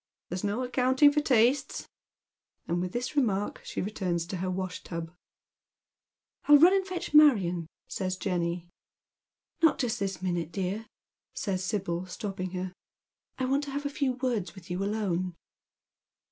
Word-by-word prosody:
"There's 180 +2 -3
no 205 +5 0
accounting 260 +3 +4
for 300 +1 +2
tastes; 255 0 +2 0.4
" - - -57
and 175 +1 0
with 180 0 -2
this 245 +6 -3
remark 210 -8 0
she - - -3
returns 180 -4 -1
to 180 +2 -4
her 185 +1 -2
wash 185 0 -3
tub. 165 -1 -5 0.6
" - - -61
I'll 295 0 +9
run 345 +6 +7
and 385 -1 +1
fetch 360 -5 -4
Marion," 195 - +5 0.2
eays 185 -1 -2
Jenny. 175 -2 -1 0.9
"Not 325 -2 +5
just 240 -3 -1
this 195 -1 -2
minute, 175 -3 -2
dear," 195 +4 -3 0.5
says 190 -3 -2
Sibyl, 185 -3 -2
stopping 185 0 -4
her. 185 0 -3 0.6
"I 260 - 0
want 275 +3 +1
to - - -7
have 285 +1 -3
a - - +1
few 275 -2 0
words 245 -7 -2
with 180 -2 -11
you 180 +2 -1
alone." 185 -4 -1
195 Hz, 160 wpm, -29 LUFS, 180-255 Hz, 0.9 s, I'll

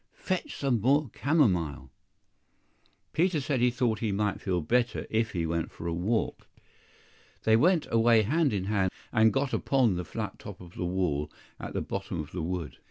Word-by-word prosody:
fetch 185 -2 -3
some 130 -6 +1
more 140 +2 +2
camomile!" 90 - +1 1.2
Peter 170 -1 +2
said 135 -1 -1
he 125 +1 +4
thought 120 -3 0
he 110 -3 -1
might 100 0 -1
feel 90 -3 0
better 120 +9 0
if 115 +1 +1
he 85 -3 -1
went 85 0 -1
for - - -10
a 85 - -1
walk. 105 +7 -1 1.0
THEY 110 - +5
went 165 +6 +4
away 115 -1 +5
hand 150 +7 +2
in 100 -3 -1
hand, 95 -2 +1 0.2
and 110 -1 +5
got 135 0 -1
upon 130 -7 +2
the 90 - -2
flat 80 - -5
top - - -9
of 90 -1 -12
the 90 - -3
wall 85 -5 -1 0.3
at - - -6
the - - -1
bottom 95 -3 -4
of 75 0 -6
the 90 - -4
wood. 80 -6 -4
110 Hz, 180 wpm, -28 LUFS, 90-130 Hz, 1.2 s, THEY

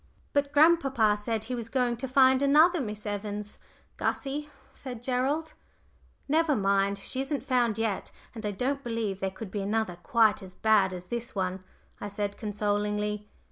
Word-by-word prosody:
"But 285 0 +1
grandpapa 275 -9 +4
said 215 +1 -2
he 240 +3 -5
was 235 -2 -4
going 245 -1 +1
to 265 +3 -4
find 260 0 +5
another 310 +4 +5
Miss 210 -3 -5
Evans, 205 0 -4 0.4
Gussie," 290 +2 -2 0.2
said 245 -3 -8
Gerald. 270 +6 0 0.7
"Never 310 0 +3
mind. 200 -1 +2
She 255 +6 -3
isn't 275 +1 -3
found 240 -4 +2
yet; 220 -4 -2 0.2
and 225 -2 -8
I 210 - 0
don't 265 +7 -2
believe 225 -5 -2
there 195 - -1
could 190 +1 -9
be 205 - -2
another 205 -3 -1
quite 215 +4 +3
as 185 -1 -11
bad 215 -3 +3
as 180 -1 -7
this 235 +4 -5
one," 185 -1 -2 0.4
I - - -5
said, 205 0 -3
consolingly. 210 0 -2
225 Hz, 165 wpm, -28 LUFS, 205-265 Hz, 0.7 s, find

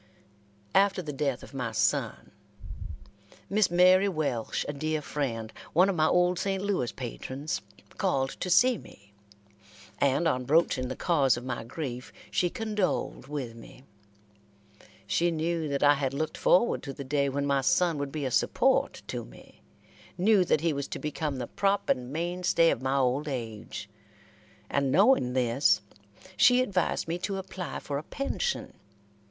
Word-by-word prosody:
After 195 -1 +3
the 150 -2 -5
death 135 -2 -2
of - - -12
my 125 -4 -3
son, 105 -2 0 1.2
Miss 205 -1 +3
Mary 185 +3 +5
Welsh, 145 - -2
a 145 - -3
dear 155 +2 -1
friend, 120 -7 -4 0.2
one 180 +4 +5
of 195 - 0
my 155 -1 +3
old 180 +1 +2
St. 195 -1 -1
Louis 190 -12 0
patrons, 130 - -5 0.4
called 135 0 +1
to 185 - -3
see 245 +7 +4
me, 100 +1 -17 0.9
and 140 +4 +2
on 130 -5 0
broaching 140 -3 +2
the 130 - -4
cause 140 -8 +2
of 120 - -7
my 130 -3 -3
grief, 125 0 -6 0.2
she 175 - +1
condoled 210 - -2
with 135 -5 -4
me. 115 +2 -14 1.2
She 170 +11 +1
knew 165 0 -1
that 140 0 -1
I 145 0 +7
had 140 -2 -2
looked 155 +2 -2
forward 210 +7 +3
to 135 - -6
the 140 - -7
day 140 +1 0
when 140 +1 -2
my 140 -1 +2
son 175 +1 +2
would 140 -1 -3
be 150 -2 -3
a 130 - -2
support - - +1
to - - -5
me - - -16 0.6
knew 195 +1 +4
that 155 - +2
he 165 -1 +1
was 140 0 -3
to - - -5
become 150 -2 -3
the 125 - -3
prop 200 +9 0
and 125 0 0
main 175 +4 -3
stay 170 -2 +4
of - - -2
my 135 +1 0
old 135 +3 +1
age, 110 -5 -5 0.8
and 140 +2 0
knowing 185 - +4
this, 125 -1 +2 0.5
she 250 +5 +6
advised 195 -11 0
me 170 +2 -2
to 195 +2 -3
apply 190 -1 -6
for 140 -1 -4
a - - -9
pension. 290 - -3
150 Hz, 165 wpm, -28 LUFS, 130-180 Hz, 1.2 s, I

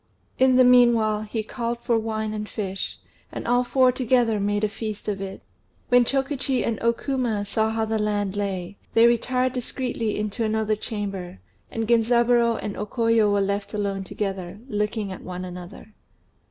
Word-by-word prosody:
In 260 0 +5
the 255 - +7
meanwhile 235 -4 +5
he 215 +1 -3
called 235 +2 -3
for 235 - +1
wine 220 -1 -2
and 210 0 -4
fish, 195 -2 -4 0.3
and - - -6
all 245 +1 +3
four 255 0 +4
together 245 -3 +2
made 205 +1 0
a - - +4
feast 215 0 -6
of 200 -2 -2
it. 195 0 -6 0.5
When 245 -1 +5
Chokichi 270 -1 0
and 225 -3 -1
O 235 - +4
Kuma 235 -5 -2
saw 220 +2 0
how 220 0 0
the 220 0 -1
land 205 -2 -1
lay, 195 -2 -3 0.2
they 230 +1 +7
retired 250 +2 +2
discreetly 245 -3 -2
into 210 +2 -2
another 220 0 +1
chamber, 200 - -5 0.3
and 225 -1 -3
Genzaburô 235 0 +3
and 205 - -4
O 210 - -3
Koyo 230 -2 +2
were 200 0 +2
left 200 +2 -2
alone 200 -2 -2
together, 190 -2 -4
looking 210 -2 -2
at 185 - -7
one 180 0 -6
another. 180 +4 -10
220 Hz, 170 wpm, -24 LUFS, 205-240 Hz, 0.5 s, the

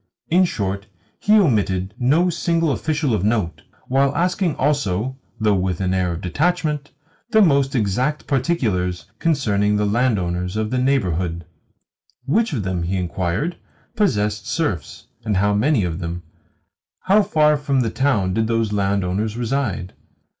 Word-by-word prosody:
In 185 +2 +5
short, 100 - -3 0.3
he 210 - +2
omitted 100 - +1
no 160 +9 +3
single 165 -1 0
official 150 -2 -1
of 105 - 0
note, 105 -5 0 0.3
while 135 +2 +2
asking 180 -1 +1
also 130 -4 0 0.2
(though 105 -1 +3
with 95 -2 -1
an 95 -1 0
air 90 -2 0
of 85 - -6
detachment) 150 - -1 0.4
the 220 -2 +4
most 140 -8 +3
exact 125 +7 0
particulars 110 - 0
concerning 105 -10 +1
the 105 - +1
landowners 100 -5 0
of 110 0 -1
the 130 - 0
neighbourhood. 90 - 0 0.8
Which 220 - +1
of 120 -9 -2
them, 95 -2 -2
he 90 +3 -1
inquired, 90 - -2 0.4
possessed 105 - 0
serfs, 110 - -3 0.2
and 105 -3 0
how 105 +2 +2
many 115 +2 +2
of 85 -1 -3
them? 85 0 -5 0.8
How 200 +3 +4
far 150 -5 +3
from 140 -2 0
the 115 -3 -1
town 110 -10 +1
did 110 +2 +1
those 115 -2 0
landowners 100 +2 0
reside? 120 -7 -2
110 Hz, 145 wpm, -21 LUFS, 95-145 Hz, 0.8 s, In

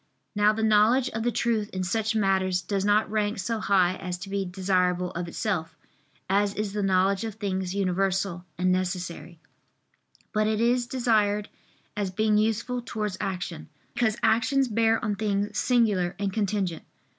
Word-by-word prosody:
Now 210 0 +4
the 220 +1 -2
knowledge 220 +4 +4
of 225 - -4
the 240 +2 +1
truth 220 -2 0
in 185 0 -3
such 220 +4 -1
matters 190 -3 +1
does 195 +1 -1
not 205 0 +2
rank 210 -1 0
so 225 +4 -2
high 185 -3 +2
as 180 -1 -4
to 185 +2 -9
be 200 -1 -1
desirable 180 -1 0
of 170 +1 -4
itself, 165 -3 -3 0.5
as 200 +1 +1
is 210 -1 -3
the 210 - -1
knowledge 195 +1 +2
of 220 -3 -4
things 190 -3 -3
universal 190 -1 0
and 185 +1 +2
necessary; 180 -2 -3 0.9
but 215 0 +2
it 215 -1 0
is 240 +1 +2
desired 215 -5 +1 0.5
as 205 -2 -1
being 210 +2 +2
useful 225 +3 0
towards 210 -5 -3
action, 180 - -4 0.2
because 240 -2 +1
actions 235 +5 +3
bear 225 0 +2
on 210 -1 0
things 205 -1 -1
singular 205 -8 +2
and 200 -1 -2
contingent. 195 -5 -1
205 Hz, 160 wpm, -26 LUFS, 185-220 Hz, 0.9 s, Now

